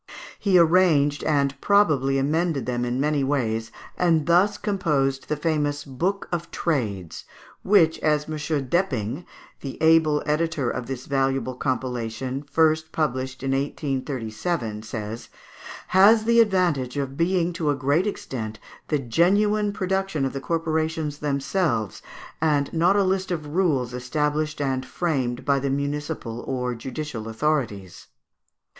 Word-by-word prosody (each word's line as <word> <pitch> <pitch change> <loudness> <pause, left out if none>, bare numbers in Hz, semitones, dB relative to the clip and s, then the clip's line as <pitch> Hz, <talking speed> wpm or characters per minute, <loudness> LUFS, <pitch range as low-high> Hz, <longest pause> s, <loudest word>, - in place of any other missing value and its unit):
He 195 -3 +3
arranged 160 -4 +4
and 140 -2 +2
probably 150 -10 +3
amended 155 +1 0
them 125 -1 -1
in 120 +1 -2
many 145 0 +1
ways, 115 -5 -1 0.2
and 165 -4 +2
thus 185 +5 +3
composed 150 -11 -1
the 150 - +1
famous 150 -2 -1
"Book 175 +9 -2
of 170 -1 -3
Trades," 105 - -2 0.4
which, 180 -5 +4
as 150 -1 +2
M. - - -6
Depping, 145 - -1 0.3
the 135 -2 -7
able 160 -2 +4
editor 150 -4 0
of 120 - -5
this 130 -1 -5
valuable 135 -2 0
compilation, 125 0 -3
first 160 0 +2
published 130 -4 -2
in 135 - 0
1837, 135 -3 -2
says, 110 0 -6 0.6
"has 215 +4 +6
the 235 +1 +4
advantage 175 - +2
of 135 -1 -3
being 175 +2 +1
to 160 -3 -1
a 145 - +2
great 145 +8 +1
extent 110 - -5 0.3
the 150 - +1
genuine 205 - +2
production 190 -6 -1
of 135 - -3
the 135 - -4
corporations 160 0 -1
themselves, 140 - -1 0.4
and 145 -3 +1
not 175 +4 +3
a 200 - +4
list 190 0 0
of 165 -4 -3
rules 145 -7 0
established 150 +5 -1
and 135 -2 -1
framed 130 -5 -2
by 140 -1 +3
the 140 +1 -2
municipal 140 -3 -3
or 125 -1 -2
judicial 120 -1 -6
authorities." 115 - -2
145 Hz, 135 wpm, -24 LUFS, 130-165 Hz, 0.6 s, has